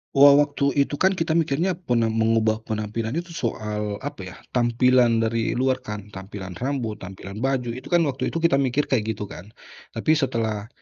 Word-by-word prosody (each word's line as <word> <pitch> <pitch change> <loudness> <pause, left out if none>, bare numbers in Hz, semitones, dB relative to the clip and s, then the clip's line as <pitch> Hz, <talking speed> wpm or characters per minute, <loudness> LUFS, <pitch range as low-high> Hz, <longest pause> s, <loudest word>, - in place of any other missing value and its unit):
Wa 140 0 +8
waktu 145 -1 +2
itu 140 0 +1
kan 190 +1 +3
kita 165 -2 -1
mikirnya 165 +2 +1
pena 120 -10 0
mengubah 110 0 +2
penampilan 110 +3 -3
itu 170 0 -4
soal 105 -7 -3
apa 145 -7 -5
ya, - - -9 0.2
tampilan 120 -1 +3
dari 115 0 0
luar 130 +1 +1
kan, 105 -4 -8
tampilan 95 -1 -8
rambut, 125 -5 -2
tampilan 95 +2 -8
baju, 125 -1 0
itu 130 +2 -8
kan 175 -2 +3
waktu 135 -3 -1
itu 165 0 -3
kita 140 -5 +4
mikir 135 +2 0
kayak 110 -4 +1
gitu 105 -2 -3
kan. 95 -1 -9 0.5
Tapi - - +1
setelah 115 -8 0
120 Hz, 180 wpm, -24 LUFS, 110-140 Hz, 0.5 s, Wa